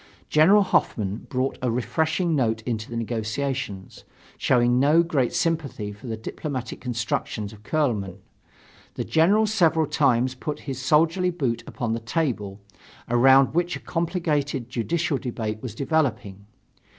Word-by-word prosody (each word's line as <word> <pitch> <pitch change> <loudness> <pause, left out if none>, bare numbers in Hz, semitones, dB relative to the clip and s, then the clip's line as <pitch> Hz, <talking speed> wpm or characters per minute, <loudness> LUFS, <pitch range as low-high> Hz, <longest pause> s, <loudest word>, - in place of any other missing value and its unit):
General 190 +7 +6
Hoffmann 105 - -1
brought 130 0 -1
a 125 - 0
refreshing 160 +8 0
note 110 -5 0
into 110 -3 -3
the 120 - -4
negotiations. 115 -2 -3 0.3
Showing 120 -1 +2
no 150 +5 +5
great 145 -7 0
sympathy 150 -11 -1
for 105 +5 -11
the 110 -1 -3
diplomatic 130 +3 -5
constructions 110 -3 -3
of 105 - -14
Kuehlmann, 105 - -1 0.8
the - - -2
General 195 +7 +3
several 170 -7 +2
times 130 -3 +2
put 150 +3 -5
his 135 -2 -5
soldierly 165 +7 +3
boot 130 -9 -2
upon 115 -2 -3
the 115 - -2
table, 115 -6 -2 0.5
around 130 +3 +5
which 175 +1 0
a - - -6
complicated 150 -7 -2
judicial 150 +4 -1
debate 110 -4 -4
was 120 -5 -6
developing. 110 - -1
130 Hz, 135 wpm, -24 LUFS, 115-160 Hz, 0.8 s, General